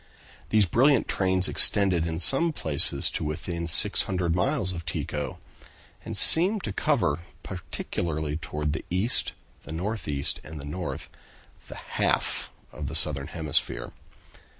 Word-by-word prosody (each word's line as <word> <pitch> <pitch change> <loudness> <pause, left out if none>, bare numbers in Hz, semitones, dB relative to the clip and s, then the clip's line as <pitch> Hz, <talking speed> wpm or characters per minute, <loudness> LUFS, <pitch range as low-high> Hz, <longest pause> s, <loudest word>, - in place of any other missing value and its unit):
These 110 -2 +2
brilliant 130 - +2
trains 95 -1 +1
extended 95 -5 +4
in 80 0 -4
some 135 - +5
places 75 - +1
to - - -4
within 85 +2 -5
600 85 +1 +3
miles 100 -2 -1
of 85 -2 -7
Tycho, 75 -2 -5 0.7
and - - -4
seemed 190 +5 +6
to - - -5
cover, 115 - -1 0.2
particularly 80 -3 -5
toward 75 -2 -5
the 80 - -5
east, 95 +7 +2 0.3
the - - -13
northeast 80 -5 -3
and 75 +1 -10
the 70 - -9
north, 85 +5 -7 0.6
the - - -11
half - - -2 0.2
of 75 -1 -8
the 80 - -7
southern 75 -4 +1
hemisphere. 75 -7 -4
85 Hz, 130 wpm, -25 LUFS, 75-100 Hz, 0.7 s, seemed